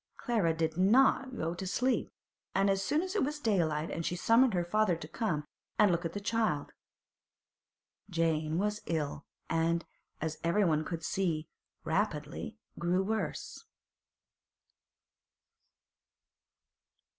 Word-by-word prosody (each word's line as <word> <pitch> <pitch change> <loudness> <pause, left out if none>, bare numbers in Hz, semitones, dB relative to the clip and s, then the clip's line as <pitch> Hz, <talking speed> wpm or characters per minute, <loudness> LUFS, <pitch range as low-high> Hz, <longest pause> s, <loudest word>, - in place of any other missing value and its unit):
Clara 220 -9 +1
did 160 0 -1
not 255 +6 +4
go 165 +1 -1
to 185 +2 -5
sleep, 250 +6 +1 0.5
and 195 +1 +4
as 195 0 0
soon 300 - +1
as 375 0 -4
it 410 - +2
was 295 +2 -2
daylight 165 - 0
she 175 - -1
summoned 230 +4 +4
her 175 -1 +1
father 210 0 +2
to 160 -2 -8
come 165 -4 -2 0.3
and 210 -3 +6
look 170 0 0
at 165 - -3
the 205 - -3
child. 215 -8 0 1.4
Jane 160 -2 +1
was 210 +2 0
ill, 155 -3 -2 0.2
and, 165 +1 +1 0.3
as 160 0 -3
everyone 170 -3 +3
could 165 -2 -4
see, 165 -5 -1 0.4
rapidly 160 +3 -2 0.2
grew 175 +2 +2
worse. 220 +2 -3
175 Hz, 120 wpm, -32 LUFS, 160-215 Hz, 1.4 s, and